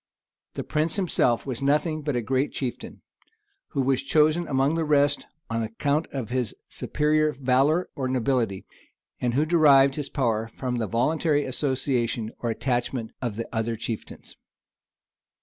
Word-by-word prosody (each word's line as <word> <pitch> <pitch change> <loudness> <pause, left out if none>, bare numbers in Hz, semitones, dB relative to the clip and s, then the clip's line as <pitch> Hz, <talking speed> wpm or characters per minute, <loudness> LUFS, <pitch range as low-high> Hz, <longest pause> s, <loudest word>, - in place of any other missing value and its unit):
[*] - - -65
The - - -3
prince 155 +1 0
himself 160 - +1
was 130 -3 -4
nothing 150 +3 +1
but 145 -2 -2
a 120 - 0
great 130 +5 0
chieftain, 130 -3 -5 0.6
who 140 - -1
was 130 0 +1
chosen 155 +4 +3
from - - -11
among 135 +2 +2
the 165 0 0
rest 145 -1 +2 0.2
on 115 0 -1
account 140 +8 -1
of 125 -5 -4
his 125 -4 -1
superior 155 0 +1
valor 135 +6 +2
or 130 -2 -2
nobility; 125 -6 0 0.5
and 120 -1 0
who 150 +3 +3
derived 145 -4 +5
his 145 -2 -3
power 115 -5 0
from 125 -2 -2
the 115 -2 -1
voluntary 145 +5 +1
association 130 -4 -1
or 120 - -2
attachment 120 -1 -2
of 120 -5 -2
the 115 +1 -4
other 115 +1 0
chieftains. 115 0 -6
135 Hz, 155 wpm, -25 LUFS, 120-150 Hz, 0.6 s, derived